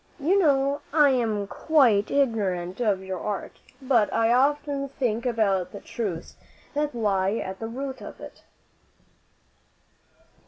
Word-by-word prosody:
You 350 +8 +3
know 280 -3 +2
I 295 -2 +5
am 220 -5 0
quite 235 -4 +3
ignorant 200 -9 0
of 200 -5 +1
your 190 -1 -5
art, 205 +1 -5 0.2
but 250 -6 +2
I 230 +1 +2
often 280 +1 +1
think 240 -3 -1
about 195 -6 +1
the 200 - -7
truths 195 -8 -5 0.4
that 295 -2 -1
lie 200 -3 +1
at 190 -4 -5
the 225 - -4
root 265 +3 -5
of - - -9
it." - - -11
230 Hz, 130 wpm, -25 LUFS, 200-275 Hz, 0.4 s, I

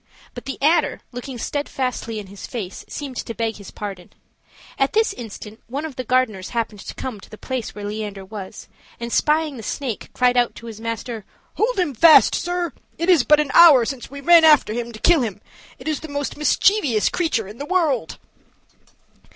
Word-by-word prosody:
But - - -9
the 270 - -5
adder, 320 +1 +2
looking 250 +1 -7
steadfastly 250 -4 -3
in 210 - -6
his 195 +1 -10
face, 200 -6 -6
seemed 275 -4 -6
to 230 - -5
beg 225 -1 -2
his 200 - -11
pardon. 195 -4 -7 0.7
At 270 - +2
this 440 -2 +2
instant 220 - -9
one 280 +6 -4
of 305 -5 -7
the 255 - -4
gardeners 230 -6 0
happened 225 -3 -2
to - - -8
come 250 -6 -5
to - - -15
the 215 - -11
place 255 -2 -5
where 205 -1 -6
Leander 205 -2 -5
was, 195 -1 -9 0.3
and 235 0 -5
spying 305 -2 +1
the - - -7
snake, 235 +1 -4
cried 250 0 +2
out 240 -1 +2
to 235 - -11
his 225 -1 -9
master: 230 -1 -4 0.3
"Hold 475 +2 0
him 355 -7 0
fast, 315 +7 +7
sir; 350 -2 -2 0.2
it 335 +3 -1
is 325 -8 +5
but 300 +3 +5
an 295 -3 0
hour 295 -9 +8
since 260 0 -5
we 280 0 -9
ran 340 +2 +7
after 300 -8 +5
him 235 0 -4
to 220 - -10
kill 340 +2 +4
him: 215 -4 -3 0.4
it - - -11
is 310 -3 -1
the 315 - -8
most 285 -1 -3
mischievous 300 - +2
creature 315 - -1
in 210 +4 -11
the - - -3
world." 310 - 0
250 Hz, 200 wpm, -21 LUFS, 220-300 Hz, 0.7 s, hour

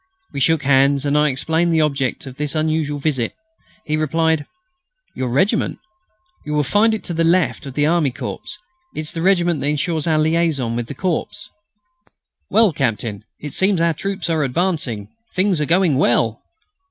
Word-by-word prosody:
We 140 - -3
shook 160 +3 +2
hands, 140 +1 +3
and 145 0 +1
I 150 0 +4
explained 160 +6 0
the 160 -1 +3
object 140 -4 -1
of 130 -1 -10
this 150 0 -2
unusual 155 -1 0
visit. 135 -5 -1 0.5
He 155 - 0
replied: 160 0 +1 0.7
"Your 130 - -2
regiment? 145 - +1 0.7
You 150 0 -3
will 150 - +2
find 215 - +3
it - - -7
to 175 - -4
the 165 0 +1
left 170 -3 +1
of 135 - -8
the 145 - +2
Army 160 -2 +2
Corps. 120 - -6 0.5
It's 155 -1 -4
the 165 - -4
regiment 175 -4 +2
that 140 - -1
ensures 150 +2 -1
our 160 -1 +3
liaison 155 -6 +1
with 120 -1 -3
the 140 - -7
Corps." 180 +2 -1 1.2
"Well, 215 -3 +4
Captain, 115 -6 -2 0.2
it 150 -2 -7
seems 190 -1 +2
our 165 0 +2
troops 195 +4 -4
are 160 -2 +1
advancing. 140 - -1 0.3
Things 185 -3 +2
are - - +1
going 170 -5 +3
well!" 115 -4 +2
155 Hz, 175 wpm, -20 LUFS, 135-170 Hz, 1.2 s, I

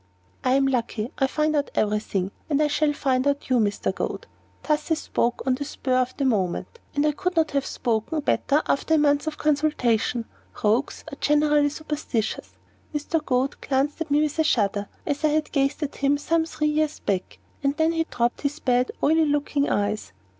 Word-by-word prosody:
"I 255 - +3
am 270 0 +4
lucky; 235 -3 -1
I 270 - +3
find 305 +2 0
out 290 -1 0
every 210 0 +2
thing; 195 -2 -2 0.2
and 290 -2 +2
I 305 - +4
shall 295 0 +2
find 265 -2 0
out 285 -1 -1
you, 250 - +4
Mr. 205 -2 0
Goad." - - -4 0.4
Thus 300 +1 0
I 320 - +3
spoke 245 -5 -1
on 260 - +3
the 270 +3 -2
spur 270 -2 -3
of 255 0 0
the 275 - 0
moment, 215 - -1 0.2
and 290 +1 +2
I 300 - +4
could 360 +5 -2
not 320 -1 +2
have 280 -1 0
spoken 235 +6 -1
better 290 +1 +1
after 320 +3 +2
a - - +4
month 290 0 +2
of 310 - -3
consultation. 255 -6 +1 0.4
Rogues 220 +6 +1
are 280 - -8
generally 295 0 +3
superstitious. 295 -7 -3 0.4
Mr. 300 +2 -1
Goad 260 0 0
glanced 280 +3 0
at 320 - -2
me 290 +1 +3
with 305 +1 -2
a - - +5
shudder, 205 -7 +1 0.2
as 290 +1 -2
I - - +5
had 305 0 0
gazed 275 +1 +1
at 290 - -4
him 280 +1 +2
some 320 +3 +1
three 305 -1 -1
years 305 0 0
back; 190 -2 -2 0.2
and 280 +1 0
then 320 0 +3
he 325 -1 0
dropped 240 -5 -1
his 290 +1 -1
bad, 250 -2 +1
oily 320 +1 +4
looking 290 0 0
eyes. 205 - -1
285 Hz, 200 wpm, -24 LUFS, 250-305 Hz, 0.4 s, a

